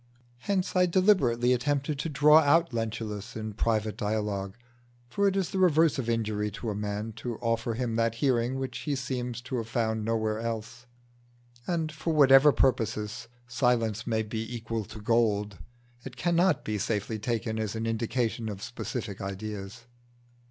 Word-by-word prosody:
Hence 185 +8 -1
I 180 0 +4
deliberately 150 - +3
attempted 140 +3 -1
to 160 - -2
draw 150 +2 +6
out 160 0 +3
Lentulus 110 -1 -4
in 110 -1 -5
private 110 0 0
dialogue, 105 -1 -2 0.5
for 200 +11 +1
it 195 - +1
is 190 -3 -1
the 190 - -1
reverse 160 -5 +4
of 120 -3 -2
injury 110 -2 0
to 110 +1 -4
a - - -4
man 105 +2 -3
to 120 -1 -4
offer 115 -1 -1
him 115 -2 -2
that 115 0 +1
hearing 125 0 +1
which 135 -1 -4
he 145 - -2
seems 125 -3 -3
to 130 +1 -4
have 115 -2 -3
found 110 -2 -1
nowhere 110 -1 0
else. 115 +2 -5 0.8
And 165 -3 -1
for 155 +2 -2
whatever 140 0 +7
purposes 110 -3 0 0.2
silence 120 -3 0
may 110 -2 +1
be 110 +1 -4
equal 115 -2 -4
to 110 - -10
gold, 105 -3 +1 0.4
it 130 -2 -9
cannot 175 -2 +2
be 105 -1 -2
safely 110 +1 -2
taken 110 0 -2
as 110 0 -2
an 110 0 -2
indication 115 0 -1
of 100 -1 -6
specific 115 -3 -5
ideas. 100 +2 -6
115 Hz, 160 wpm, -28 LUFS, 110-135 Hz, 0.8 s, whatever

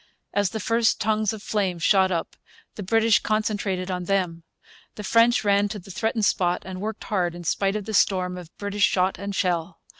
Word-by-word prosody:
As 205 -2 +1
the 220 - -4
first 230 +1 +1
tongues 215 -1 +1
of 215 -2 -8
flame 195 -5 -1
shot 190 +3 +3
up 170 -3 -3 0.4
the - - -8
British 225 +3 +3
concentrated 205 -3 -1
on 180 -1 -3
them. 180 -3 -1 0.5
The 210 - -7
French 230 +3 +4
ran 200 0 +3
to 210 - -5
the 195 0 -11
threatened 220 +2 0
spot 180 -2 +1
and 185 0 -7
worked 215 +1 -4
hard, 180 -4 -1
in 175 - -8
spite 195 +4 0
of 210 -2 -3
the 220 - -5
storm 185 -2 +2
of 180 -3 -9
British 205 0 -4
shot 185 0 0
and 200 0 -4
shell. 175 -2 -1
200 Hz, 200 wpm, -24 LUFS, 180-215 Hz, 0.5 s, French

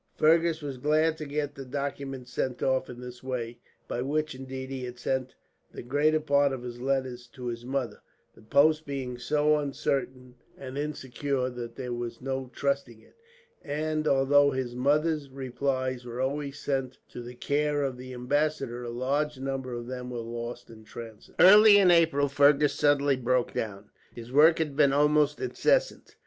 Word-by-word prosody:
Fergus 165 0 +3
was 135 -3 -5
glad 155 +3 +2
to 155 - -5
get 145 0 -2
the 135 - -8
documents 135 -1 -5
sent 125 0 -2
off 130 0 +1
in 125 -1 -9
this 125 -1 -9
way 120 -2 -4 0.3
by 120 - -3
which, 155 +3 -1
indeed, 130 0 -7
he 130 -1 -4
had 125 0 -7
sent 130 +1 -2 0.4
the - - -8
greater 145 +5 +2
part 140 -2 +2
of 130 -2 -5
his 120 -1 -7
letters 130 -2 -2
to 125 0 -10
his 120 -1 -4
mother 130 -5 -3 0.3
the - - -19
post 150 +7 +3
being 130 -3 -4
so 150 +4 +2
uncertain 130 -3 -3 0.2
and 130 -1 -8
insecure 140 -2 -2
that 120 -1 -7
there 125 -1 -5
was 120 -1 -5
no 130 0 -4
trusting 140 -4 -2
it; - - -23 0.5
and 155 +1 -2
although 140 +1 +4
his 130 -3 -3
mother's 145 +3 +1
replies 130 -1 -2
were 120 0 -7
always 140 +1 -2
sent 135 -2 -2
to 120 - -9
the 120 +1 -9
care 145 +3 0
of 135 -2 -2
the 130 +1 -9
ambassador, 130 -1 -1
a 120 - -5
large 140 +5 -1
number 135 -1 -4
of 120 0 -6
them 125 0 -6
were 125 - -5
lost 120 +1 -6
in 110 - -13
the 110 - -17
transit. 115 -2 -10
Early 205 +2 +9
in 190 -3 +6
April 160 -4 +4
Fergus 140 +1 +4
suddenly 145 -2 +2
broke 125 0 0
down. 105 -1 -5 0.2
His 120 0 -9
work 155 +4 +6
had 150 -4 -2
been 140 -2 +4
almost 150 0 +3
incessant. - - 0
135 Hz, 175 wpm, -28 LUFS, 125-145 Hz, 0.5 s, Early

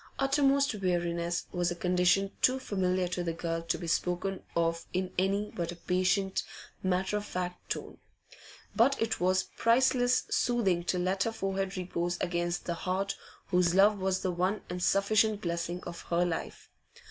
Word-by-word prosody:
Uttermost 275 0 +3
weariness 175 -3 -1
was 175 -1 0
a 175 - -3
condition 180 +2 +2
too 255 +1 +4
familiar 185 -6 0
to 180 0 -2
the 165 -1 -2
girl 165 0 -3
to 165 - -1
be 175 - -6
spoken 180 +3 -1
of 165 0 0
in 185 0 -2
any 200 +2 0
but 170 -1 -3
a - - -7
patient, 185 +2 +1 0.4
matter 185 +2 0
of 205 - -4
fact 180 -1 -5
tone. - - -5 0.8
But 265 +5 +4
it 225 -1 0
was 185 +1 +2
priceless 245 +1 +3
soothing 195 -9 +1
to 180 - 0
let 185 +2 0
her 230 - 0
forehead 195 -2 -2
repose 175 -1 -2
against 175 -1 -1
the 170 - -1
heart 185 +3 -2 0.3
whose 180 -1 +3
love 205 +1 +5
was 190 0 0
the 185 - +1
one 185 +4 0
and 180 0 -4
sufficient 210 +3 +3
blessing 170 0 -3
of 170 -1 -7
her 175 +1 +2
life. 170 -2 -5
185 Hz, 165 wpm, -30 LUFS, 175-200 Hz, 0.8 s, love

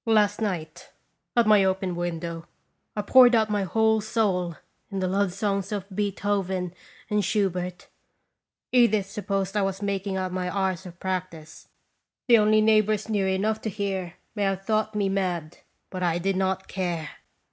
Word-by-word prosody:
Last 210 -1 +3
night, 170 -7 -4 0.5
at 235 - +5
my 210 -2 +6
open 190 -1 0
window, 170 -1 -4 0.5
I 210 - -2
poured 250 +2 +7
out 220 -1 +2
my 205 -1 +1
whole 220 +3 +2
soul 200 -6 0 0.3
in 195 - -5
the 185 - 0
love 195 0 +1
songs 195 +1 -2
of 200 -2 -3
Beethoven 195 -3 -1 0.3
and 210 0 +1
Schu 200 0 +1
bert. 180 0 -6 0.8
Edith 215 -6 +3
supposed 195 -2 -2
I 205 - +2
was 195 +1 -2
making 200 -1 -2
out 185 -1 -2
my 180 -1 -2
hours 190 -2 -1
of 175 0 -12
practice. 180 -4 -5 0.6
The 235 -2 +7
only 215 0 +4
neighbors 215 0 +3
near 205 -3 +1
enough 210 +3 0
to 220 - -2
hear 195 -4 -3 0.2
may 210 - -4
have 195 0 -1
thought 215 0 0
me 205 -2 +1
mad, 180 -4 -2 0.3
but 185 - -5
I 170 -2 +1
did 190 +2 0
not 190 0 -1
care. 175 -4 -3
195 Hz, 165 wpm, -26 LUFS, 180-210 Hz, 0.8 s, poured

